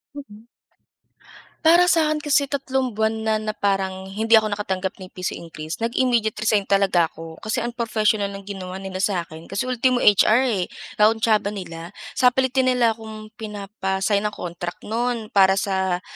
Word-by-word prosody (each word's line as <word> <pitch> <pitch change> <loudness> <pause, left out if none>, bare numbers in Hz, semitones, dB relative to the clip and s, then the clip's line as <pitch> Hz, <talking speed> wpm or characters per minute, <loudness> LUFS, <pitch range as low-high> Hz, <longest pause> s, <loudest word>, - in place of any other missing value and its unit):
Mm. 225 -6 -11 1.2
Para 345 +2 +6
sa'kin 310 -3 +2
kasi 285 -2 +1
3 265 -2 -1
buwan 220 +1 0
na, 220 0 +1
na 215 0 -3
parang 190 -1 -1
hindi 225 +3 +3
ako 220 -1 +3
nakatanggap 190 -2 -3
ni 185 - -8
piso 185 0 -4
increase, 160 -1 -7
nag-immediate 235 -1 +1
resign 210 -2 +1
talaga 195 -4 +3
ako. 160 0 -11
Kasi 225 +2 -2
unprofessional 220 -3 0
ang 195 0 -8
ginawa 190 -2 -7
nila 190 -1 -6
sa 190 -3 0
akin, 160 0 -12
kasi 195 +1 -2
ultimo 255 0 +1
HR 215 +4 +5
eh, 200 -8 0 0.3
kakuntsaba 215 -1 +3
nila. 170 -1 -8 0.2
Sapilitan 260 +1 +3
nila 245 -2 +3
akong 220 -1 -9
pinapa-sign 200 -1 -2
ng 210 - -2
contract 175 0 -6
no'n, 230 0 -2
para 190 -1 +5
sa 190 -2 -1
210 Hz, 150 wpm, -22 LUFS, 190-235 Hz, 1.2 s, Para